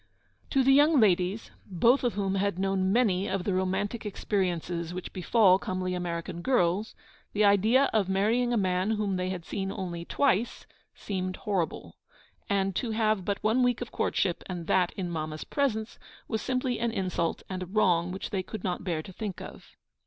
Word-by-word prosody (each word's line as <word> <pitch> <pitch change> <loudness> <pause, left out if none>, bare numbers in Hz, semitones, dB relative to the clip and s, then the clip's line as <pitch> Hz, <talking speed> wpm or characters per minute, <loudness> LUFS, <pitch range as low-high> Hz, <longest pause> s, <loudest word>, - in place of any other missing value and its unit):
To 270 -2 +3
the 270 +1 +5
young 295 +1 +5
ladies, 190 0 +2 0.2
both 230 +9 +3
of 245 - 0
whom 195 -2 -1
had 195 -1 0
known 190 0 +1
many 200 -5 +2
of 190 -1 -1
the 195 - -1
romantic 190 +4 -1
experiences 180 -4 -2
which 180 - -6
befall 190 0 +4
comely 185 -1 -3
American 170 -1 -4
girls, 200 -3 +1 0.4
the 210 0 +3
idea 220 +7 +4
of 205 -4 +2
marrying 225 +6 +2
a 240 - +2
man 185 0 +1
whom 205 -2 -1
they 185 0 -1
had 185 -2 -4
only 190 -3 -3
seen 170 - -7
twice 240 -5 +1 0.3
seemed 185 -2 -3
horrible; 190 -6 -3 0.5
and 195 -2 +1
to 245 - -2
have 215 -3 +1
but 200 +2 -3
one 220 +4 +3
week 245 -1 +2
of 245 - -6
courtship, 180 -3 0
and 175 -3 -5
that 180 +1 +2
in 185 -2 -4
Mamma's 155 -1 -4
presence, 230 -6 -2 0.3
was 220 -1 -2
simply 255 -1 -1
an 235 0 +1
insult 180 -5 -2
and 185 -1 -5
a 185 - -4
wrong 180 -3 +2
which 190 - -5
they 190 -2 -1
would 215 -4 -5
not 180 -1 -2
bear 165 -4 -2
to 190 - -11
think 200 -1 -5
of. - - -11
195 Hz, 180 wpm, -28 LUFS, 180-220 Hz, 0.5 s, the